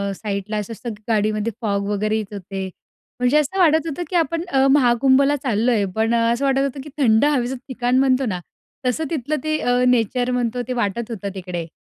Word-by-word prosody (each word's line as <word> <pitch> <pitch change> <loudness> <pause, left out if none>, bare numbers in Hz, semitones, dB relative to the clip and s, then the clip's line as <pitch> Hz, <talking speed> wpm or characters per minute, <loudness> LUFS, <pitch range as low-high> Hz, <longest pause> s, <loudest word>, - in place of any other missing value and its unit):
साईडला 205 +1 -4
असं 210 +2 -4
असतं 235 0 -6
गाडीमध्ये 215 0 0
फॉग 200 -2 -1
वगैरे 215 +1 0
येत 210 -1 -5
होते. 195 0 -5 0.5
म्हणजे 250 +4 +3
असं 300 +6 0
वाटत 320 -2 +4
होतं 320 +3 -3
की 365 - -4
आपण 330 0 +1
अ, 270 0 +3
महाकुंभला 270 +1 +4
चाललोय, 225 -3 +1
पण 225 +1 +1
असं 235 +4 +1
वाटत 270 0 +2
होतं 275 0 -3
की 300 - -10
थंड 230 -1 +4
हवेचं 265 -3 +1
ठिकाण 250 -1 0
म्हणतो 265 0 +3
ना, 185 -5 -2 0.5
तसं 250 +6 0
तिथलं 305 -1 -2
ते 310 0 0
अ, 245 0 +1
नेचर 245 +1 +1
म्हणतो 245 0 -1
ते 255 - -2
वाटत 235 0 -2
होतं 200 -2 -4
तिकडे. 175 -3 -5
245 Hz, 190 wpm, -21 LUFS, 215-270 Hz, 0.5 s, वाटत